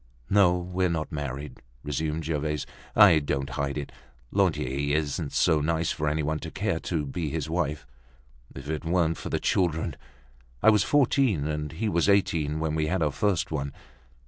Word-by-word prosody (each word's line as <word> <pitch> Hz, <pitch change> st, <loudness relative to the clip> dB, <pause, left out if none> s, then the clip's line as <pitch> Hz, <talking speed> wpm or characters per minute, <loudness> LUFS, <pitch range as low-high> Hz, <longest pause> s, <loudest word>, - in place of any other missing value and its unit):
"No, 95 Hz, -3 st, +5 dB
we're 90 Hz, +1 st, -1 dB
not 80 Hz, -2 st, -2 dB
married," 70 Hz, 0 st, -5 dB, 0.2 s
resumed 75 Hz, +2 st, -2 dB
Gervaise. 75 Hz, -1 st, -2 dB, 0.3 s
"I 100 Hz, -7 st, +8 dB
don't 70 Hz, -1 st, -2 dB
hide 70 Hz, +1 st, -2 dB
it. 70 Hz, -, -5 dB, 0.4 s
Lantier 70 Hz, +3 st, +1 dB
isn't 75 Hz, 0 st, -2 dB
so 75 Hz, -, +3 dB
nice 80 Hz, +2 st, 0 dB
for 75 Hz, -, -2 dB
any 75 Hz, +1 st, 0 dB
one 75 Hz, +1 st, -1 dB
to 80 Hz, -, -6 dB
care 100 Hz, -1 st, -1 dB
to 80 Hz, -4 st, -2 dB
be 75 Hz, +3 st, -3 dB
his 80 Hz, -1 st, -3 dB
wife. 75 Hz, -4 st, -1 dB, 0.7 s
If 70 Hz, +2 st, -8 dB
it 75 Hz, 0 st, -3 dB
weren't 80 Hz, -1 st, +1 dB
for -, -, -5 dB
the -, -, 0 dB
children! 80 Hz, -4 st, 0 dB, 0.7 s
I 110 Hz, -, +8 dB
was 105 Hz, -2 st, +4 dB
fourteen 130 Hz, -, +2 dB
and 75 Hz, 0 st, -3 dB
he 105 Hz, +7 st, -2 dB
was 85 Hz, -1 st, +2 dB
eighteen 80 Hz, -6 st, +2 dB
when 80 Hz, -1 st, -1 dB
we 80 Hz, -1 st, 0 dB
had 90 Hz, 0 st, 0 dB
our 75 Hz, -, +1 dB
first 100 Hz, -1 st, 0 dB
one. 70 Hz, -2 st, -3 dB
80 Hz, 175 wpm, -27 LUFS, 75-90 Hz, 0.7 s, I